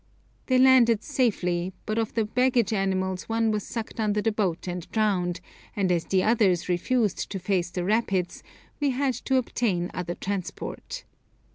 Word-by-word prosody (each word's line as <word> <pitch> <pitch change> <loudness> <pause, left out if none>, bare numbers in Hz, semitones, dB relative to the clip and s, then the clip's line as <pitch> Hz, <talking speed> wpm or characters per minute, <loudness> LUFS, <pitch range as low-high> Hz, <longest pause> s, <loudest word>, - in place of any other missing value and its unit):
They 255 - +3
landed 255 -4 +5
safely, 185 -10 0
but 215 +1 -1
of 225 0 -2
the 225 -2 +2
baggage 245 -1 +2
animals 190 -1 -1
one 225 0 +2
was 210 -1 -1
sucked 225 -1 -5
under 210 -1 +1
the 225 +2 +1
boat 190 -5 -1
and 180 -1 -5
drowned, 180 -5 0 0.3
and 195 -3 +1
as 170 -2 +1
the 190 -1 +2
others 210 -6 +2
refused 210 +4 0
to 195 - -4
face 180 -1 0
the 175 0 -3
rapids, 195 -4 0 0.4
we 290 -1 +2
had 265 0 0
to 265 +3 -1
obtain 210 -8 0
other 175 -1 -4
transport. 200 - -5
210 Hz, 160 wpm, -26 LUFS, 180-235 Hz, 0.4 s, landed